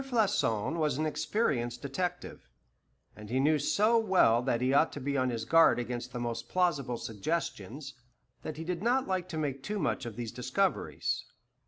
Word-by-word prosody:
Floçon 195 - +1
was 150 -5 +1
an 155 - 0
experienced 125 - -1
detective, 140 - -4 0.7
and 105 -1 -11
he 130 +3 +1
knew 150 +2 +3
so 215 - +3
well 185 - +4
that 125 -2 0
he 130 +2 +1
ought 155 +3 +4
to - - -5
be 140 +1 -2
on 130 -1 +2
his 115 -2 -3
guard 165 0 +5
against 120 0 -4
the 120 - -5
most 120 -1 -4
plausible 150 -9 +1
suggestions, 135 - -4 0.5
that 155 - -6
he 160 - -5
did 175 0 -3
not 250 +4 +2
like 185 -1 -1
to 165 - -4
make 140 -3 -2
too 210 +9 -3
much 150 -8 -1
of 115 - -7
these 115 -1 -5
discoveries. 130 +11 -1
140 Hz, 180 wpm, -30 LUFS, 120-180 Hz, 0.7 s, guard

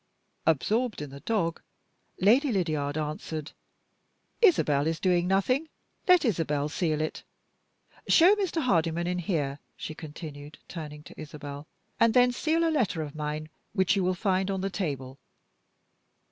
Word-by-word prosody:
Absorbed 215 - +1
in 145 -2 -6
the 140 - -9
dog, 170 -4 -1 0.6
Lady 245 +9 +4
Lydiard 155 -7 -1
answered, 155 0 -4 0.9
"Isabel 155 - +4
is 165 0 -1
doing 180 -2 +2
nothing, 255 - +1 0.4
let 360 -4 +6
Isabel 150 - 0
seal 155 -1 0
it. 155 - -3 0.9
Show 350 +4 +7
Mr. 360 -6 -1
Hardyman 170 -6 +1
in 180 0 -1
here," 150 -6 -1 0.2
she 155 - -5
continued, 150 -2 -9
turning 150 -3 -7
to - - -11
Isabel, 145 -1 -8 0.3
"and 230 0 +4
then 250 0 +6
seal 325 +6 +1
a - - +2
letter 210 - +1
of 145 -2 -7
mine 150 0 -4 0.2
which 190 -1 +3
you 195 - +1
will 185 0 +1
find 190 +1 0
on 195 -1 -1
the 195 +1 -2
table." 140 -8 -4
170 Hz, 145 wpm, -28 LUFS, 150-210 Hz, 0.9 s, Show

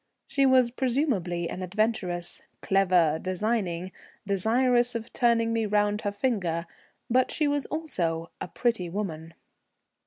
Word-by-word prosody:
She 275 -1 +2
was 255 -2 +4
presumably 235 - 0
an 185 - -6
adventuress, 185 -3 -1 0.2
clever, 180 -5 +3
designing, 185 -2 -1 0.3
desirous 240 +5 +2
of 230 +1 -5
turning 230 -1 +2
me 225 -1 0
round 210 0 +1
her 205 - -1
finger, 200 -7 -1 0.4
but 255 +2 +3
she 305 - +1
was 290 -1 0
also 170 - -2
a - - -3
pretty 225 -3 -1
woman. 165 -4 -5
210 Hz, 125 wpm, -27 LUFS, 180-240 Hz, 0.4 s, was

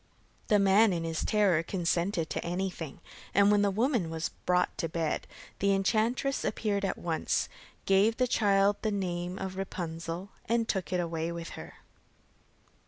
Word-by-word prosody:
The 210 - +5
man 200 +1 +5
in 170 -1 -2
his 165 -1 -2
terror 200 -6 +3
consented 170 0 -1
to - - -2
everything, 175 -4 -4 0.3
and 200 +1 +6
when 205 -1 +4
the 205 - +3
woman 220 - +1
was 160 0 -2 0.2
brought 180 0 +2
to 165 - -1
bed, 160 -1 -2 0.3
the 200 0 +3
enchantress 230 +7 +1
appeared 205 -2 -1
at 195 - -1
once, 165 -2 -1 0.4
gave 200 +4 +4
the 255 - +3
child 200 -3 +3
the 220 - 0
name 180 -2 -2
of 190 -1 -5
Rapunzel, 175 -1 -4 0.2
and 230 -1 +2
took 190 -4 -2
it 180 - +1
away 165 -1 -2
with 170 0 -6
her. - - -9
190 Hz, 160 wpm, -30 LUFS, 170-205 Hz, 0.4 s, and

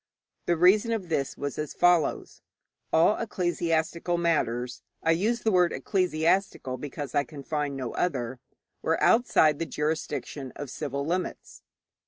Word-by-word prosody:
The 175 - +2
reason 205 +7 +5
of 195 -6 -3
this 140 -4 -1
was 145 +1 -4
as 150 -1 -4
follows: 175 -2 +2 0.5
All 165 +6 +5
ecclesiastical 175 -4 -1
matters 125 -8 0 0.2
I 165 - +3
use 215 +8 +1
the 220 - +1
word 180 -2 +4
'ecclesiastical' 175 -6 0
because 145 0 -6
I 145 -1 +3
can 140 0 -10
find 145 -2 -2
no 130 -3 -4
other 130 -7 -2 0.4
were - - +1
outside 160 -11 +4
the 165 - -2
jurisdiction 150 -3 -3
of 145 -3 -6
civil 140 -2 -3
limits. 180 +3 -4
160 Hz, 140 wpm, -27 LUFS, 140-180 Hz, 0.5 s, reason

